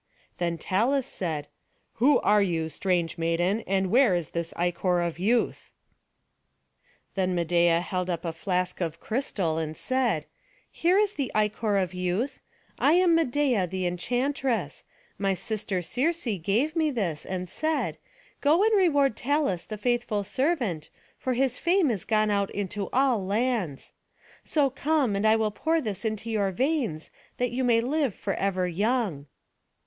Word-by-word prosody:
Then 170 -1 -1
Talus 235 - +1
said, 160 - -4 0.5
"Who 285 +4 +6
are 210 0 +4
you, 165 -4 0
strange 170 0 -1
maiden; 175 +6 +1
and 190 -1 +1
where 245 -6 +5
is 170 -5 -3
this 170 -1 -3
ichor 175 +1 +1
of 170 -1 -2
youth?" 225 +6 0 1.4
Then 185 -1 0
Medeia 170 0 +3
held 180 0 -3
up 170 -1 -3
a 165 - -2
flask 180 +2 -2
of 165 -1 -3
crystal, 195 - -1
and 155 -1 -4
said, 240 - 0 0.5
"Here 355 +3 +2
is 415 -1 +2
the 275 -4 -3
ichor 210 0 +1
of 185 -2 0
youth. 180 +8 -2 0.4
I 295 - +4
am 355 -1 +5
Medeia 265 - +2
the 185 0 -2
enchantress; 245 +8 -1 0.4
my 195 -1 +1
sister 195 -1 -3
Circe 315 - -1
gave 240 - +1
me 320 -2 +2
this, 190 - -2
and 185 -1 -4
said, 315 - -1 0.4
'Go 315 +7 +4
and 440 0 +4
reward 285 - +3
Talus 275 - 0
the 215 - -6
faithful 235 -2 0
servant, 245 - -1 0.3
for 255 - -1
his 255 0 +1
fame 345 -5 +3
is 205 -5 -3
gone 215 -1 +2
out 200 -1 +1
into 205 0 -3
all 255 -5 +2
lands.' 205 - -1 0.5
So 285 -4 +1
come, 280 -5 +1
and 200 +2 +1
I 215 - +6
will 220 -1 +1
pour 320 +9 0
this 215 - -4
into 220 0 -3
your 205 -3 +1
veins, 245 - -1 0.3
that 245 -1 0
you 255 +2 -1
may 235 -2 +4
live 270 -2 0
forever 195 -2 -1
young." 195 - -1
210 Hz, 155 wpm, -27 LUFS, 180-260 Hz, 1.4 s, Who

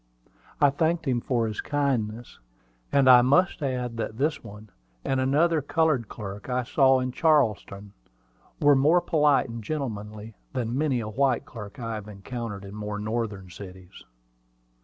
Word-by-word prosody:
I 145 -1 +5
thanked 165 +3 0
him 125 -2 +1
for 120 -2 0
his 110 -1 -3
kindness; 120 -6 -2 0.5
and 140 -2 +3
I 125 -1 +9
must 155 +8 +2
add 125 -4 -2
that 110 -1 -4
this 150 +4 -1
one 105 +1 -12 0.3
and 135 - 0
another 150 +5 +2
colored 145 -6 +1
clerk 100 +1 -8
I 125 0 0
saw 130 +1 +3
in 130 0 -2
Charleston, 110 -10 +1 0.7
were 145 -1 +5
more 150 +6 +4
polite 150 -5 +2
and 115 -1 -7
gentlemanly 110 -5 -5 0.2
than 120 -2 -2
many 135 -4 0
a 110 - -5
white 130 +3 0
clerk 105 -4 -10
I 115 -1 -4
have 105 -1 -6
encountered 105 0 -7
in 100 - -10
more 105 0 -5
northern 105 -3 -4
cities. 95 -1 -12
120 Hz, 155 wpm, -26 LUFS, 105-140 Hz, 0.7 s, I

